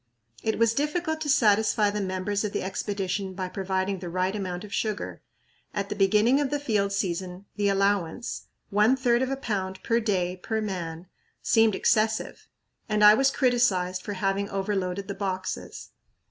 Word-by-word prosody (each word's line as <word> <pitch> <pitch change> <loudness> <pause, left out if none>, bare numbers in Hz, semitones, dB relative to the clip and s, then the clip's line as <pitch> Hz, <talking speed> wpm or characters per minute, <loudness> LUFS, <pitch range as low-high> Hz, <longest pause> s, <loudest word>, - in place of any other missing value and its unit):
It 220 - -1
was 230 0 +3
difficult 315 +4 -1
to 300 - -2
satisfy 215 -3 +3
the 210 0 -2
members 190 +2 -2
of 210 - -3
the - - -1
Expedition 195 0 -3
by 185 -1 -3
providing 190 0 -2
the 175 -1 -6
right 185 +3 -1
amount 185 -2 -4
of 210 0 -9
sugar. 215 -2 -3 0.5
At 200 -1 -2
the - - -3
beginning 210 +7 +4
of 285 - 0
the 290 - -1
field 210 -8 0
season 185 -1 -3
the 205 -1 +1
allowance 195 +1 0 0.2
one 210 +5 +4
third 245 -2 +2
of 260 - 0
a 270 - 0
pound 190 -7 -3
per 230 0 +2
day 185 -5 -1
per 220 +4 -2
man 175 -5 -4 0.4
seemed 225 -3 +4
excessive, 220 0 0 0.4
and 210 0 +2
I 210 0 +10
was 270 +5 +4
criticized 235 -10 +1
for 205 - -5
having 195 +1 -1
overloaded 195 -1 -2
the 200 - -3
boxes. 190 -1 -4
200 Hz, 170 wpm, -26 LUFS, 190-220 Hz, 0.5 s, I